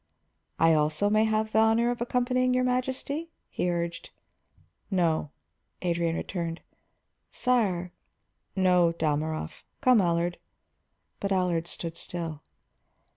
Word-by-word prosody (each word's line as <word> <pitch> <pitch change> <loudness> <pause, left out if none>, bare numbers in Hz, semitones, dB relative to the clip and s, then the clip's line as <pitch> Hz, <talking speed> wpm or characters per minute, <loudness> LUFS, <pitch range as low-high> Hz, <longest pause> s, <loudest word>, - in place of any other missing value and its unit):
"I 165 0 +5
also 155 +6 +2
may 215 +1 +4
have 220 0 0
the 220 - +3
honor 225 +2 +4
of 240 - -5
accompanying 250 +1 +1
your 255 - +3
Imperial 250 0 +2
Majesty?" 280 +5 -3 0.2
he 180 - -1
urged. 170 -1 -3 0.8
"No," 170 -6 +1 0.5
Adrian 170 -2 0
returned. 170 -2 -4 0.7
"Sire 195 -9 +1 0.4
" - - -49
"No, 175 -2 +4
Dalmorov. 155 -1 -2 0.2
Come, 250 -4 +5
Allard." 170 0 0 0.8
But 200 - -2
Allard 180 -3 +1
stood 170 -1 -6
still. 165 -4 -5
180 Hz, 120 wpm, -28 LUFS, 170-235 Hz, 0.8 s, I